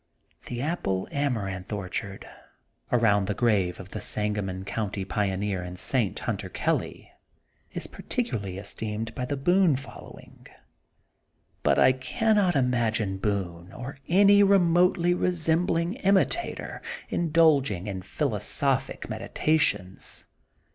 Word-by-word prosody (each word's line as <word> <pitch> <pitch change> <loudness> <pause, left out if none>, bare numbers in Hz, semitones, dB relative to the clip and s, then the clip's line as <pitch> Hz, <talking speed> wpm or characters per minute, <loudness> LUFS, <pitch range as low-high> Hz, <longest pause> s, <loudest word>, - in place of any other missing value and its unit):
*^The 120 - -2
Amaranth 105 -10 -2
Apple 105 - -3
orchard, 100 +1 -5 0.7
around 105 -5 +3
the 105 - -1
grave 100 -7 +1
of 95 0 -9
the - - -6
Sangamon 105 -3 -2
County 100 -2 -3
pioneer 100 -1 -1
and 90 0 -7
saint, 105 0 0
Hunter - - -3
Kelly, - - -2 0.6
is - - -5
particularly 105 - -4
es 100 - -5
teemed 110 +1 -4
by 125 - -3
the 140 +2 -3
Boone 175 +2 +3
following. 135 +1 -11 1.1
But - - +3
I - - +6
cannot 190 +8 +1
imagine 115 -6 +1
Boone 95 -4 -3
or 135 +2 -8
any 200 +3 +6
re 200 0 +6
motely 175 0 +3
resembling 170 0 +1
imitator 200 - 0 0.3
indulging 150 - +2
in 95 -3 -4
phil - - -2
osophic - - 0
meditations. 150 -12 -1
120 Hz, 115 wpm, -27 LUFS, -, 1.1 s, I